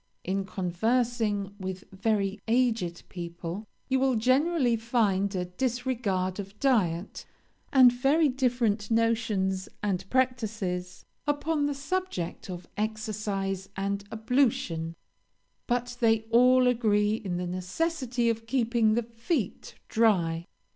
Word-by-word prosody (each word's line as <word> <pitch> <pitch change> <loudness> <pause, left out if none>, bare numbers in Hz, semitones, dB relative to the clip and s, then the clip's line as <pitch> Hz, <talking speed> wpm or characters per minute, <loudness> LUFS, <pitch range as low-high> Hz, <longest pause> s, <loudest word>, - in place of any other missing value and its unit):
In 195 +1 -1
conversing 205 +2 0
with 190 0 -5
very 200 0 0
aged 225 -8 +1
people, 175 +3 -6 0.2
you 265 0 +2
will 265 -1 +2
generally 255 +2 +3
find 215 -4 +1
a 180 -1 -1
disregard 215 -3 -1
of 200 +1 -8
diet, 205 -9 +1 0.5
and 260 -3 +8
very 280 +6 +3
different 245 -6 0
notions 220 -4 +1
and 195 -2 -1
practices 215 -8 -1 0.2
upon 290 0 +1
the 290 - -2
subject 280 - -3
of 180 -1 -7
exercise 210 -3 -2
and 200 +1 -1
ablution; 220 -9 0 0.7
but 245 0 -1
they 225 -2 +4
all 250 +2 +6
agree 215 -4 +3
in 195 -5 -3
the 180 - -2
necessity 240 - -1
of 225 0 -1
keeping 230 -3 +2
the 235 - +1
feet 230 - -3
dry. 175 -7 +2
220 Hz, 115 wpm, -28 LUFS, 190-250 Hz, 0.7 s, and